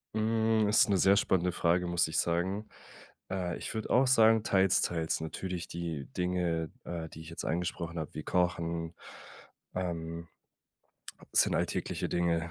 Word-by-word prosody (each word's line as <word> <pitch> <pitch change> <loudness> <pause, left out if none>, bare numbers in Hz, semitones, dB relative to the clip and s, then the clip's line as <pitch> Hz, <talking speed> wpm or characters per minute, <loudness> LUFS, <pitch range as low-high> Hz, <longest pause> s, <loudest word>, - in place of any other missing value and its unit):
Hm, 110 0 +2
ist 105 - +5
'ne 100 - +3
sehr 95 +2 +5
spannende 90 -3 +2
Frage, 90 +1 +1
muss 85 0 +2
ich 80 - 0
sagen. 95 +5 -1 0.6
Äh, 90 -2 -2
ich - - -6
würde 110 -1 -4
auch 130 +2 +4
sagen, 115 -3 +5
teils, 95 -3 +3
teils. 80 -2 -1
Natürlich 90 +2 -4
die 85 -5 -4
Dinge, 90 -3 -1
äh, 85 -2 -5
die 80 - -11
ich 80 - -10
jetzt 85 - -6
angesprochen 85 0 -2
habe, 80 - -6
wie 75 - -6
Kochen, 85 -2 -1 0.8
ähm 85 -2 -4 1.1
sind - - +5
alltägliche - - -1
Dinge, 85 -1 0
85 Hz, 150 wpm, -31 LUFS, 85-95 Hz, 1.1 s, ist